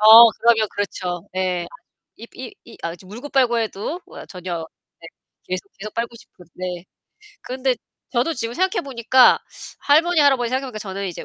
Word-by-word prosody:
아, - - 0 0.4
그러면 225 -2 +4
그렇죠. 185 -2 -3
예. 185 -2 0 0.5
입 230 - -13
이 250 -2 -8
이 230 - -13
아 170 - -2
그쵸, 180 +2 -13
물고 235 +9 -8
빨고 245 -4 +3
해도 225 - -3
우와, - - -11
전혀 175 -3 -5 0.3
네. 165 - -11 0.4
계속, 185 +1 -3
계속 215 +1 -7
빨고 235 0 -2
싶은. 180 - -17
네. 180 -1 -5 0.6
그런데 255 0 0 0.4
저도 260 +7 +1
지금 230 -1 -1
생각해 370 +1 +1
보니까 255 -1 +5 0.4
할머니 320 +3 +4
할아버지 265 -5 +4
생각해 260 +1 -1
보니까 215 - -7
저는 195 -1 -4
이제 175 - -7
230 Hz, 340 characters per minute, -22 LUFS, 185-260 Hz, 0.6 s, 보니까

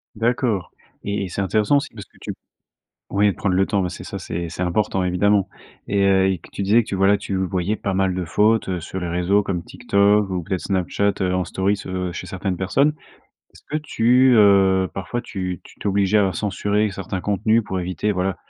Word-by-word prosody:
D'accord 115 -3 0 0.3
et 100 0 -1
et 95 - -5
c'est 100 - -3
intéressant 105 +7 +2
aussi, 140 +2 -3
parce 105 -3 -9
que - - -26
tu - - -5 0.8
ouais 100 0 +3
de - - -9
prendre 100 -4 0
le 95 +1 +3
temps, 100 -1 0
bah 90 - -1
c'est 85 - -8
ça, - - -6
c'est 85 +1 -4
c'est 85 - -7
important, 95 +1 0
évidemment. 100 +2 +2 0.4
Et, 100 -1 +1
heu, 95 -1 +4
et 95 - -1
que - - -16
tu - - -5
disais 110 +4 +4
que - - -19
tu - - -3
voilà, 95 +2 +4
tu 100 - -4
voyais 95 +1 -1
pas 100 -2 -3
mal 95 -1 +1
de 90 - -2
fautes, 110 +4 +2
heu, 90 -1 -1
sur 90 +3 -6
les 90 -1 -4
réseaux 90 +4 +2
comme 90 -3 -2
TikTok 100 -1 +2
ou 90 -1 -2
peut-être 90 +2 -3
Snapchat 100 +1 0
heu 90 -1 +1
en 90 - +1
story 95 +3 0
ce 95 -2 -4
chez - - -6
certaines 95 0 -3
personnes. 135 - +2 0.6
Est-ce - - -18
que 150 - 0
tu, 125 -2 +3
heu, 95 -3 +5
parfois 95 +6 -3
tu 90 -6 -5
tu - - -17
t'obligais 100 +1 +2
à 95 -2 +2
censurer 105 +2 0
certains 95 -1 -5
contenus 110 +4 +1
pour 95 -2 -4
éviter 90 +3 -2
voilà, 95 -1 -1
95 Hz, 215 wpm, -21 LUFS, 95-105 Hz, 0.8 s, heu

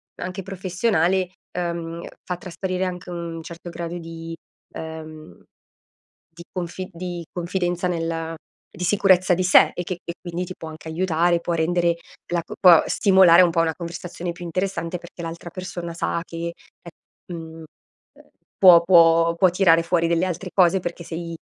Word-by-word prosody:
anche 185 +2 -5
professionale, 185 -1 0 0.3
uhm, 170 -1 -4 0.2
fa 180 -1 -4
trasparire 185 +1 -3
anche 180 0 -6
un 170 -1 -5
certo 170 +1 -9
grado 170 0 -5
di, 165 0 -8 0.4
ehm, 155 - -9 0.9
di 170 +1 -11
confi 185 0 -5
di 175 0 -6
confidenza 175 0 -2
nel 165 -1 -2 0.4
di 180 - -5
sicurezza 185 -2 +4
di 185 - -1
sé 180 - +6
e 175 - -3
che 180 0 -5
e 170 - -5
quindi 175 0 -4
ti 185 0 -8
può 160 - -8
anche 155 0 -11
aiutare, 170 0 +1
può 170 - -2
rendere 170 +1 +2 0.4
la 170 - +1
c - - -10
può 175 -4 +8
stimolare 185 -3 +6
un 175 - +3
po' 165 0 +2
una 160 -1 0
conversazione 175 +1 -6
più 175 +1 -10
interessante, 185 0 -2
perché 170 0 -12
l'altra 170 +1 -7
persona 175 -2 -6
sa 170 0 -2
che 170 0 -5 0.3
è 170 - -10 0.4
mhmm, 165 -1 -8
uhm, - - -10 0.9
può 180 -3 +8
può 170 -1 +5
può 185 +1 +4
tirare 170 -2 +4
fuori 170 0 +1
delle 170 +2 +1
altre 180 +1 -4
cose, 185 0 +4
perché 175 -1 -6
sei, 165 0 -6
170 Hz, 160 wpm, -23 LUFS, 165-180 Hz, 0.9 s, può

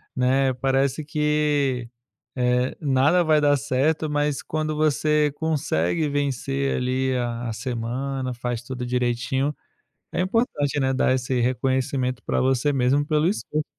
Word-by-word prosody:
né, 130 +1 +2
parece 135 +3 0
que, 150 -4 0 0.5
eh, 125 0 +1
nada 145 +5 +3
vai 155 -1 +4
dar 145 -1 +4
certo. 145 +3 0
Mas 145 -1 0
quando 155 0 -2
você 150 0 +2
consegue 150 - 0
vencer, 140 -1 -1
ali, 130 +1 0
a 120 -1 -2
a - - -3
semana, 130 +3 -3
faz 120 0 -4
tudo 125 0 -5
direitinho 125 +3 -1 0.6
é - - -1
importante, 185 - 0
né, 135 0 +1
dar 130 - +2
esse 125 -1 -1
reconhecimento 130 +1 0
pra - - 0
você 130 +2 +2
mesmo 135 +2 +2
pelo 155 0 +2
esforço 155 -5 -1
135 Hz, 135 wpm, -24 LUFS, 125-150 Hz, 0.6 s, vai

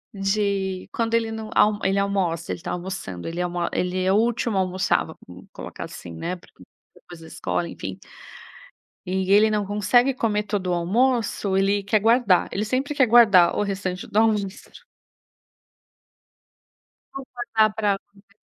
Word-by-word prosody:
de 195 -1 -1
quando 230 0 -1
ele 230 -1 +1
não 220 -1 -6
al 210 0 +4
ele 195 +1 +1
almoça, 190 -4 -1
ele - - -6
tá 180 - -4
almoçando 175 - -6
ele 170 +2 -5
almo 175 0 -2
ele 180 +1 -1
é 190 - +2
o - - +3
último 230 -1 0
a - - +3
almoçar, 185 0 0
vamos 90 - -13
colocar - - -8
assim, 85 - -9
né, 175 - -4
porque 180 - -19 0.3
depois 175 -2 -14
da 165 - -12
escola, 170 +1 -3
enfim 95 - -7 1.1
e 190 +1 -1
ele 215 +2 +6
não 210 -1 0
consegue 210 +6 +2
comer 215 -4 0
todo 200 -3 -3
o 180 - +1
almoço, 205 +2 +1
ele 200 +1 +1
quer 205 +2 +2
guardar. 225 -4 +3
Ele 200 - -2
sempre 265 +6 -2
quer 265 - +4
guardar 215 -7 +6
o - - +1
restante 195 -2 -4
do - - -4
almoço. 210 - -1 2.3
Vou 275 -1 -7
contar 225 -3 +1
pra 205 -2 0
você. 200 0 -24
200 Hz, 160 wpm, -23 LUFS, 185-220 Hz, 2.3 s, ele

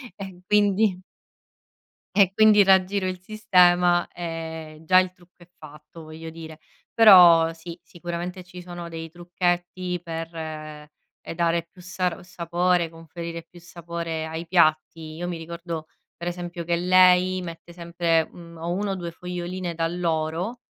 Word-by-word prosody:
e 190 -2 -9
quindi 205 -2 +2 1.1
e 195 -3 +5
quindi 210 0 +6
raggiro 190 0 +3
il 185 -1 -4
sistema, 180 -3 +3
ehm, 160 -2 -7
già 185 +3 +6
il 185 -1 0
trucco 180 0 -25
è 175 - -17
fatto, 150 +2 -13
voglio 160 +1 -9
dire, 160 -1 -10 0.3
però 175 -7 +8
sì, 165 +1 -10
sicuramente 175 +1 -6
ci 180 0 -11
sono 175 -1 -8
dei 165 -1 -7
trucchetti 175 +1 -2
per, 165 -1 -5
ehm 155 -2 -7 0.5
dare 170 0 +1
più 180 - -16
sar 180 -1 -3
sapore, 175 0 0
conferire 165 +1 -8
più 175 - -17
sapore 170 -2 -5
ai 160 +1 -6
piatti, 155 -2 +1
io 175 +2 -5
mi 175 - -4
ricordo, 165 -1 -7 0.3
per 170 - -6
esempio, 175 -1 -5
che 170 0 +1
lei 185 +1 +4
mette 170 -1 -9
sempre, 170 -1 0
mhmm, 170 -1 -13
o 165 +1 -4
1 200 +2 -2
o - - -2
2 175 -2 -5
foglioline 180 +1 -5
d'alloro, 165 +5 -2
175 Hz, 140 wpm, -24 LUFS, 165-180 Hz, 1.1 s, però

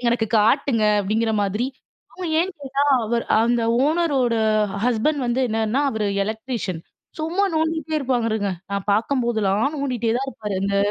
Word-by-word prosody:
எனக்கு 235 -1 +1
காட்டுங்க 230 +1 +2 0.2
அப்பிடிங்கிற 220 +3 0
மாதிரி. 210 +5 -1 0.5
அவுங்க 365 -1 -6
ஏன் 375 +2 -1
கேட்டா, 275 0 -1 0.2
அவரு 235 +1 -1 0.2
அந்த 235 0 +2 0.2
ஓனரோட 290 -6 +1 0.5
ஹஸ்பெண்ட் 250 +5 +1
வந்து 240 +2 0
என்னன்னா, 225 +4 0
அவர் 220 -2 -2 0.2
எலக்ட்ரீசியன். 220 -5 -4 0.4
சும்மா 345 +6 0
நோண்டிகிட்டே 320 0 -1
இருப்பாங்க 250 -5 0
இருங்க. 205 -2 -1 0.2
நான் 200 0 -3
பார்க்கும்போதெல்லாம் 225 +1 +1
நோண்டிகிட்டே 250 -5 -1
தான் 270 +2 -2
இருப்பாரு. 210 -6 -5
அந்த 200 0 0
235 Hz, 140 wpm, -22 LUFS, 220-280 Hz, 0.5 s, காட்டுங்க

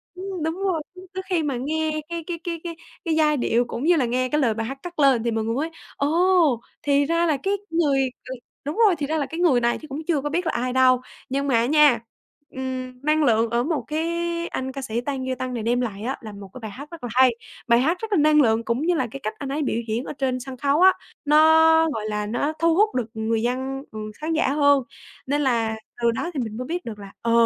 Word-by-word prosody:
Đúng, 370 -3 -5
đúng 320 +1 -1
rồi, 370 -4 -1
cho 365 - -11
tới 375 0 -4
khi 340 -4 +1
mà 275 -4 -1
nghe 310 +4 -1
cái 340 -1 -4
cái 340 -2 -4
cái 335 -2 -4
cái 335 -2 -6 0.3
cái 325 -2 +1
giai 300 -2 +3
điệu 240 0 +1
cũng 240 +1 -5
như 345 +3 +5
là 275 -6 +2
nghe 255 +2 0
cái 300 +2 +1
lời 235 -5 +2
bài 225 +1 -3
hát 270 +2 -5
cất 350 -2 -8
lên 270 -5 +4
thì 235 - 0
mình 225 0 -1
mới 305 +5 -1 0.3
ồ, 325 -3 +3 0.2
thì 285 0 +3
ra 335 +3 +2
là 310 -4 +2
cái 390 - +1 0.2
người 285 -5 +2 0.2
đ - - -5 0.3
đúng 295 +6 -3
rồi, 370 - +3
thì 290 -1 -2
ra 315 +2 0
là 290 - 0
cái 325 +4 -7
người 300 -9 +4
này 235 0 +1
chứ 310 - -10
cũng 280 +3 -5
chưa 315 -5 +1
có 295 - -2
biết 345 +4 -1
là 320 - +1
ai 250 +1 -1
đâu. 255 -1 +4 0.3
Nhưng 275 +2 -1
mà 265 - +2
á 230 0 +3
nha, 295 -3 +5 0.5
ừm, 255 -1 -5
năng 305 +1 +2
lượng 230 -3 +3
ở 235 +1 +1
một 310 +1 -1
cái 310 +1 -1 0.4
anh 260 0 -4
ca 275 +1 -6
sĩ 235 -2 -2
Tăng 265 0 -3
Duy 260 - -1
Tân 255 0 -4
này 235 -3 -3
đem 240 +2 +1
lại 205 -4 -4
á 260 +4 -2
là 220 -3 -8
một 200 -1 -10
cái - - -9
bài 220 -2 -6
hát 285 +9 -10
rất 335 -4 -10
là 245 - -3
hay, 255 0 +6 0.4
bài 235 -1 +5
hát 320 +8 +2
rất 445 -1 -3
là - - +4
năng 300 0 +5
lượng 225 -3 +2
cũng 235 +4 0
như 355 - +4
là 260 -6 0
cái 275 - -7
cách 215 - -2
anh 280 - -5
ấy 290 +3 -1
biểu 235 -5 -1
diễn 225 +3 -1
ở - - -5
trên 265 -3 -1
sân 255 +1 -8
khấu 285 +5 +1
á, 375 0 +8 0.3
nó, 300 +1 +5 0.6
gọi 215 - -4
là, 210 0 -2
nó 245 +8 -1
thu 330 0 +3
hút 425 +3 +3
được 250 -3 0
người 220 0 -1
dân, 260 +3 -2
ừ, 215 - -7 0.2
khán 320 +1 -1
giả 320 -2 +2
hơn 285 -2 +4 0.4
nên 290 +2 +1
là 230 -5 +1 0.3
từ 235 0 +3
đó 340 +9 -3
thì 290 - -3
mình 220 -2 -5
mới 250 - -4
biết 355 +3 -3
được 215 -3 -7
là, 200 -1 -10
ờ, 230 - 0
275 Hz, 270 wpm, -23 LUFS, 240-315 Hz, 0.6 s, á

